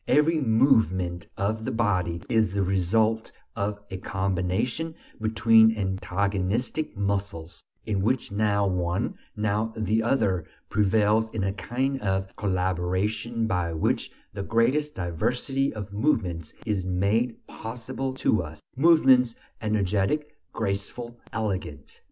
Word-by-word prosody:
Every 155 +2 +3
movement 110 - +2
of 110 +3 -1
the - - -2
body 90 -7 0
is 110 -4 +2
the 100 - +2
result 110 +4 +1 0.2
of 100 +1 -1
a 95 - -3
combination 95 - -1 0.3
between 110 0 +5
antagonistic 100 - -1
muscles, 100 -5 -2 0.2
in 105 -3 0
which 120 +3 0
now 100 0 +2
one, 90 -1 0 0.2
now 105 +1 0
the 110 +1 +1
other 100 -8 +1 0.3
prevails 105 +2 +3
in 110 -3 -3
a 95 0 0
kind 130 +5 -2
of 95 -1 -1
collaboration 95 +4 -1
by 90 -6 0
which 80 - 0 0.2
the 100 - -4
greatest 130 +9 +1
diversity 125 - -1
of 105 -2 -7
movements 95 - 0
is 105 -4 0
made 100 +6 +1
possible 125 +4 -5
to 110 -5 +2
us: 80 -1 -8 0.2
movements 130 -5 +5 0.3
energetic, 105 +8 0 0.2
graceful, 115 +3 -4
elegant. 95 -10 -4
105 Hz, 115 wpm, -26 LUFS, 95-115 Hz, 0.3 s, between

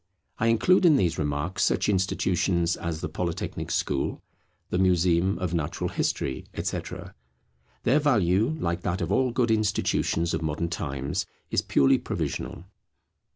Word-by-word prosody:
I 115 - +2
include 145 +12 +4
in 165 -4 +6
these 85 - +1
remarks 75 +4 -1
such - - +2
institutions 90 -3 +1
as 85 -1 -4
the - - -2
Polytechnic 85 -2 -4
School, - - -1 0.5
the 90 - +1
Museum 90 0 +3
of 90 -3 -3
Natural 80 -4 -2
History, 65 - -1
etc. - - -4 0.7
Their 135 +6 +4
value, 110 - +2
like 85 0 -1
that 90 +2 -2
of 85 - -2
all 130 -1 +3
good 120 -1 +1
institutions 105 -5 +1
of - - -1
modern 80 +2 -2
times, 70 -4 -3 0.2
is - - +2
purely 70 - +3
provisional. - - -4
90 Hz, 140 wpm, -26 LUFS, 85-110 Hz, 0.7 s, in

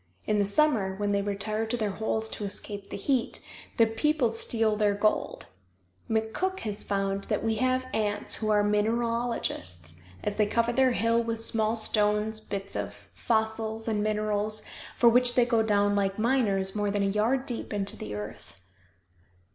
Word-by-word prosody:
In 210 -1 +1
the 200 - +3
summer, 205 -4 +2
when 205 +1 -1
they 200 0 +1
retire 205 +2 -2
to 245 +2 -1
their 215 -3 -1
holes 220 +2 -2
to 210 - -6
escape 200 0 -5
the - - -5
heat, 250 +3 +1 0.4
the 230 - +6
people 240 +3 +1
steal 225 -1 +1
their 205 -1 +2
gold. 215 +1 0 0.6
McCook 225 +13 -1
has 210 -1 -3
found 195 0 -1
that - - -1
we 225 -1 0
have 255 +2 +1
ants 205 -1 +1
who 215 - -2
are 210 -1 +4
mineralogists, 210 - -1 0.2
as 205 - -2
they 210 -1 +3
cover 230 +2 +1
their 260 0 +3
hill 230 0 +2
with 230 -1 -2
small 225 -1 +1
stones, 215 0 +1
bits 200 -2 -4
of - - -6
fossils 220 0 -1
and 215 -2 0
minerals, 215 0 0 0.3
for 240 - +5
which 245 +1 +5
they 245 - +5
go 230 -2 +2
down 205 -2 +2
like 195 -1 0
miners 215 -5 +2
more 205 -1 0
than 200 0 0
a - - +2
yard 220 +7 +1
deep 240 -3 -5
into 200 0 -1
the 105 - -6
earth. 105 -2 -8
215 Hz, 170 wpm, -28 LUFS, 205-230 Hz, 0.6 s, the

